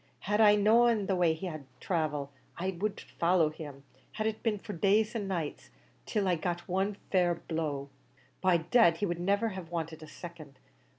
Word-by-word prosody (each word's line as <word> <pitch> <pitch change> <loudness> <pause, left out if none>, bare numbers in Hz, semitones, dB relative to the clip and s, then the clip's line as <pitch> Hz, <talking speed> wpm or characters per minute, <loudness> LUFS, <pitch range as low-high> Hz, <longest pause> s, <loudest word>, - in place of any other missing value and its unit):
Had 210 +3 +1
I 210 -1 +7
known 220 +1 +4
what 190 -1 0
way 170 -2 +4
he 160 - -6
war 155 -3 -5
to - - -15 0.2
travel, 150 -5 -1 0.3
I'd 185 0 -3 0.4
followed 170 -3 +3
him, 145 -3 -8 0.3
had 215 - -2
it 220 0 -1
been 220 -3 0
for 205 +1 -7
days 210 +5 +2
an' 205 -3 -2
nights, 170 -6 -4 0.4
till 210 -3 0
I - - +3
had 170 -3 -1
got 175 -1 -2
one 195 +3 0 0.2
fair 180 -2 +3
blow. 155 -5 -3 0.5
By 185 -2 +4
dad, 170 +1 +4
he 205 - 0
would 175 -2 -2
niver 200 +5 +1
have 185 -5 -7
wanted 165 -2 -4
a 155 - -9
second. 155 -4 -10
175 Hz, 190 wpm, -31 LUFS, 160-205 Hz, 0.5 s, I